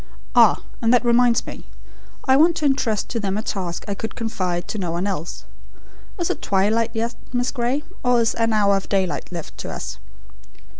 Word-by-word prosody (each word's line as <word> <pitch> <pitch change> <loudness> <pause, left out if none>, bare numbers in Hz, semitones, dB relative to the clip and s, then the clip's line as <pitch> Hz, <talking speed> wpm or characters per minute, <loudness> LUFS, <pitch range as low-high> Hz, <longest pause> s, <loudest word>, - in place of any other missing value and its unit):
Ah! - - +5 0.2
and 230 -1 +3
that 245 0 +4
reminds 240 0 +4
me: - - -9 0.6
I 265 - +5
want 325 +4 +5
to 305 - -2
intrust 235 -6 +1
to 235 - -2
them 200 -2 -1
a 215 - -2
task 180 -6 -3
I 200 - -1
could 225 +2 -5
confide 185 -6 -2
to 215 - -3
no 180 -3 -2
one 170 +3 -1
else. 180 -5 -4 0.7
Is 345 -3 0
it - - -5
twilight 215 +4 +2
yet, 230 +2 -1 0.2
Miss 245 0 0
Gray, 260 +3 -1 0.2
or 245 -1 +4
is 230 -1 +2
an 230 0 +1
hour 205 -2 +4
of 195 - -3
daylight 190 -3 -1
left 170 -3 -7
to - - -5
us?" - - -6
225 Hz, 195 wpm, -22 LUFS, 195-245 Hz, 0.7 s, Ah